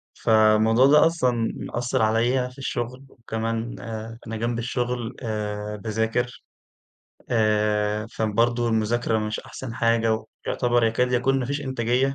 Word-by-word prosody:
فالموضوع 110 +2 +4
ده 150 +2 +6
أصلًا 125 -8 0
مأثر 125 +1 -2
عليَّ 120 +4 +2
في 125 - -19
الشغل، 130 0 -4
وكمان 115 0 -4
آآ 115 0 -6
أنا 110 0 -4
جنب 115 +1 -1
الشغل 120 -1 -2
آآ 105 -2 -3
باذاكر، 110 +3 -2 0.9
آآ 105 -1 +1
فبرضه 115 +2 +1
المذاكرة 110 0 +1
مش 105 0 -3
أحسن 120 -3 -8
حاجة، 115 -2 +1 0.2
ويعتبر 120 -1 +2
يكاد 125 +3 +1
يكون 135 +2 +2
ما 125 - -2
فيش 140 +2 -2
إنتاجية. 130 +1 0
115 Hz, 130 wpm, -24 LUFS, 110-125 Hz, 0.9 s, ده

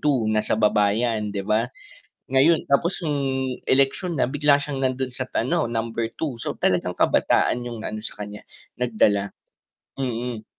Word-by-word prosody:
2. 140 -6 +2
nasa 110 0 +1
baba 105 -1 +3
'yan, 110 0 0
'di 100 - -2
ba? 110 +3 +1 0.6
Ngayon, 150 +5 +4
tapos 170 +6 +1
nung 150 -2 0 0.5
eleksyon 140 +6 +2
na, 135 - +2
bigla 145 +2 +3
siyang 145 -1 -3
nandun 130 -1 -1
sa 130 +1 -4
ano, 155 +3 +1
number 115 0 -3
2. 140 -7 -4
So - - -4
talagang 90 -1 0
kabataan 125 - +2
'yung 115 -2 -7
ano, 110 - -4
sa 105 -1 -7
kanya 105 0 -8 0.4
nagdala, 105 -4 +1 0.6
Mm. 120 -3 -3
120 Hz, 155 wpm, -23 LUFS, 110-140 Hz, 0.6 s, Ngayon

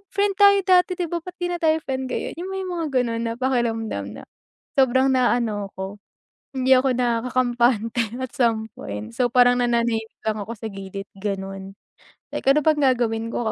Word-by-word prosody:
friend 405 0 +2
tayo 400 -1 +7
dati 365 -1 +4
'di 345 - -1
ba, 345 - -1
ba't 365 - -7
'di 355 - 0
na 350 - -1
tayo 320 -1 +3
friend 265 -1 -2
ngayon? - - -3
Yung 375 +2 -5
may 385 - -3
mga 345 -3 -3 0.2
ganon 230 -1 -2
na 230 - -1
pakiramdam 230 - -1 0.2
na - - -15 0.5
sobrang 260 0 +4
naaano 235 -5 +1
ako, 190 +2 -6 0.6
hindi 260 0 +1
ako 260 0 +2
nakakampante 240 -1 +1 0.2
at 260 - -4
some 225 -3 +1
point. 105 +2 -6
So 245 - +3
parang 245 0 +5
nananahimik 235 -2 -1
lang 215 0 0
ako 225 +3 -5
sa 225 - -5
gilid 195 0 -7
ganon. 195 -1 -5 0.6
Like, - - -4
ano 300 +2 +5
bang 305 -2 +3
gagawin 225 -1 -1
ko 225 -2 -1
240 Hz, 180 wpm, -23 LUFS, 220-265 Hz, 0.6 s, tayo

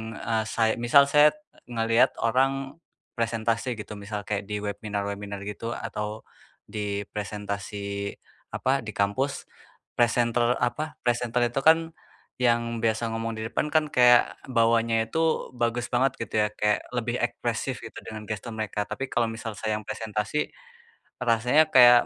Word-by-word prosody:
eee, 110 +1 -1
say 115 -1 +2
misal 120 +4 +6
saya 150 - +6
e 305 0 -26 0.2
ngeliat 115 +1 +3
orang 135 +4 +1 0.4
presentasi 115 +2 0
gitu, 105 -1 -9
misal 105 0 -5
kayak 105 -1 -3
di 105 0 -3
webinar-webinar 100 -1 -4
gitu 115 +3 -5
atau 105 -1 -5 0.4
di 105 -1 -3
presentasi 100 -1 -4 0.4
apa, 130 -2 0
di 110 - -6
kampus. 100 +8 0 0.5
Presenter 120 0 +3
apa, 150 +5 -1
presenter 120 0 +1
itu 120 - -9
kan 165 +1 +5 0.5
yang 115 -1 +2
biasa 115 +1 +1
ngomong 115 0 -2
di - - -4
depan 150 - -1
kan, 155 -1 +3
kayak 120 -1 +5
bawaannya 115 -2 +2
itu 160 - -1 0.4
bagus 120 +1 0
banget 130 +3 +3
gitu - - -6
ya, 105 - +3
kayak 105 0 +1 0.2
lebih 120 0 -1
ekspresif - - -2
gitu - - -10
dengan 110 -1 -7
gestur 110 +2 -4
mereka, 105 -1 -2
tapi 135 - -3
kalau 120 - +1
misal 115 0 -5
saya 110 -1 -1
yang 110 - -6
presentasi 110 +6 -2 0.7
rasanya 125 +6 +3
kayak 120 -1 +8
115 Hz, 145 wpm, -26 LUFS, 105-125 Hz, 0.7 s, kayak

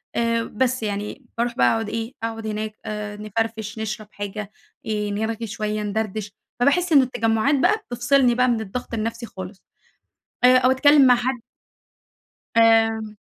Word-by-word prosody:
آآ 230 0 +1
بس 255 +2 -1
يعني، 210 +5 -4
باروح 235 +1 -1
بقى - - +5
أقعد 225 -2 -2
إيه، 230 +3 -4
أقعد 225 -1 -4
هناك 215 0 -4
آآ 210 -1 -5
نفرفش 220 0 -3
نشرب 215 -1 -4
حاجة، 205 0 -6 0.3
آآ 210 -1 -2
نرغي 220 +2 -3
شوية 215 +1 -3
ندردش، 210 0 -3 0.3
فباحس 340 +8 +2
إنه 280 -4 +7
التجمعات 230 +2 +1
بقى، 425 +10 +3
بتفصلني 245 +1 +3
بقى 250 +1 +3
من 235 -2 +1
الضغط 220 +4 -6
النفْسي 230 +1 -3
خالص، 190 -2 -9 0.8
آآ 255 +1 +7
أو 255 0 +4
أتكلّم 285 +1 +6
مع 250 - +7
حد 245 +1 -2 1.2
آمم 225 -1 +3
225 Hz, 150 wpm, -23 LUFS, 215-245 Hz, 1.2 s, إنه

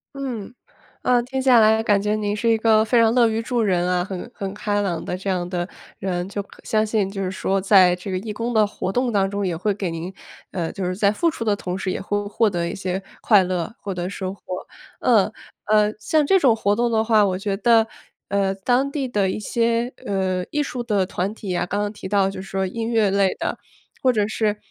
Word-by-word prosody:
嗯， 245 -6 -5 0.5
呃， 245 -1 +3
听 265 +2 -3
下 255 -3 +6
来 220 +1 +5
感 205 -2 +3
觉 210 +1 +1
您 205 0 -1
是 230 +2 +1
一 225 - +3
个 220 -1 +4
非 235 +2 +2
常 225 +1 +4
乐 240 -2 +5
于 220 0 -1
助 235 0 -1
人 180 -3 +1
啊， 180 -1 +1
很 190 +3 -6
很 195 -2 -4
开 205 0 -1
朗 175 -5 -2
的 180 - -3
这 195 +1 -3
样 180 -1 -1
的 175 0 -3 0.3
人。 180 -1 -2
就 200 0 -3
可 - - -18
相 215 0 +1
信 210 -3 0
就 195 0 -4
是 185 - -2
说 195 0 -1
在 185 -2 +6
这 185 +2 -7
个 185 - -1
义 210 +2 -5
工 230 +3 -3
的 215 -2 +4
活 190 - -4
动 245 +2 0
当 195 -1 +2
中， 200 -1 -2
也 170 -2 -1
会 205 +4 0
给 195 -2 -3
您， 165 +3 -5 0.4
呃， 170 -3 -3
就 190 - -4
是 180 0 -2
在 205 0 +3
付 335 +9 +1
出 230 - -5
的 210 -2 +2
同 185 -2 -4
时 190 -1 -2
也 - - -3
会 205 +1 -2
获 215 +1 +2
得 170 -2 -1
一 - - -4
些 190 0 -3 0.2
快 205 -4 +5
乐 180 +2 -2
获 195 -2 -5
得 180 +1 -3
收 190 -1 -4
获。 - - -23 0.6
呃 215 -3 +3 0.3
呃， 210 0 +3
像 300 +7 +2
这 385 +2 +4
种 240 -5 +4
活 205 -1 +1
动 235 +1 +1
的 220 -1 +2
话， 215 -2 +4
我 185 -2 0
觉 195 -1 -2
得， 225 0 +4 0.4
呃， 195 -1 +1
当 250 +7 +1
地 275 -2 -2
的 205 -6 0
一 - - -3
些， 235 +3 0
呃， 185 -2 -1
艺 295 - -1
术 250 -4 -3
的 205 -5 +1
团 190 +2 -2
体 195 -4 -5
啊， - - 0
刚 200 - -2
刚 205 0 -2
提 195 -3 -8
到 200 -1 +2
就 195 -1 -6
说 195 0 -2
音 225 +4 -3
乐 220 -4 +2
类 195 -1 +3
的， - - -3 0.4
或 255 -1 +4
者 210 -3 +1
是 215 -1 0
205 Hz, 260 characters per minute, -22 LUFS, 190-225 Hz, 0.6 s, 下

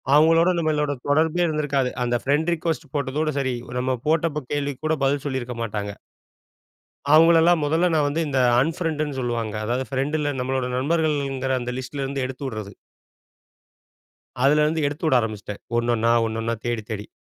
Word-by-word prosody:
அவுங்களோட 165 +3 +5
நம்மளோட 150 -2 0 0.2
தொடர்பே 160 +4 +2
இருந்திருக்காது. 145 -4 0
அந்த 120 0 0
பிரெண்ட் 150 +5 +2
ரிக்வெஸ்ட் 160 -3 -3
போட்டதோட 145 +2 -1
சரி. 130 -2 -1 0.2
நம்ம 130 0 0
போட்ட 155 -3 +1
கேள்விக்கு 145 -2 -3
கூட 160 - +2
பதில் 140 +1 +1
சொல்லியிருக்க 130 -3 -3
மாட்டாங்க. 105 -2 -3 1.2
அவுங்களல்லாம் 165 +1 +6
முதல்ல 165 +4 +2
நான் 150 -2 +2
வந்து 150 +3 -1
இந்த 135 -2 0 0.2
அன் 155 +6 +1
பிரெண்ட்ன்னு 155 -5 -2
சொல்லுவாங்க. 115 -3 -2
அதாவது 125 +4 -1
பிரெண்ட்ன்னா 145 +2 -1
நம்மளோட 130 0 -1
நண்பர்கள்ங்கிற 140 -3 0
அந்த 120 0 -4
லிஸ்ட்ல 135 +2 -5
இருந்து 135 0 -3
எடுத்து 130 +2 -7
விட்றது. 110 -5 -6 1.7
அதுல 150 +2 +5
இருந்து 160 0 0
எடுத்து 145 +3 -4
விட 130 - +4
ஆரம்பிச்சிட்டேன். 105 -2 -5 0.2
ஒண்ணொண்ணா 115 -1 +2 0.2
ஒண்ணொண்ணா 115 +1 -2
தேடி 120 -2 -1
தேடி. 105 -1 -5
140 Hz, 145 wpm, -23 LUFS, 125-155 Hz, 1.7 s, அவுங்களல்லாம்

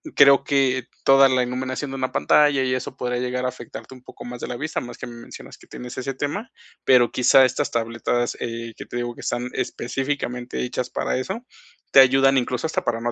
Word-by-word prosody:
creo 140 0 +6
que 130 -3 +1 0.2
toda 135 0 +6
la 130 -1 +2
iluminación 130 +2 -4
de - - -5
una 130 -1 -2
pantalla 145 -3 +3
y 130 -1 0
eso 130 0 -4
podría 125 -1 -2
llegar 125 0 -2
a - - +1
afectarte 125 +1 -10
un 125 - -17
poco - - -12
más 120 0 -7
de - - -4
la 125 - -5
vista, 155 +5 -3
además 120 - -9
que - - -6
me 120 - -10
mencionas 115 - -11
que - - -19
tienes 125 0 -9
ese 135 +1 -3
tema, 145 - -4 0.3
pero 125 -2 +5
quizá 130 +1 +5
estas 130 +2 -1
tabletas, 120 +1 -1
eh, 115 0 -5
que - - -8
te - - -6
digo 120 0 -3
que - - -11
están 125 +1 -3
específicamente 125 -1 -3
hechas 125 0 -3
para - - -1
eso, 190 - -4 0.5
te - - +7
ayudan 135 +1 +5
incluso 125 +3 -1
hasta 160 - -2
para 115 -1 -1
no 120 0 -1
125 Hz, 220 wpm, -23 LUFS, 120-135 Hz, 0.5 s, te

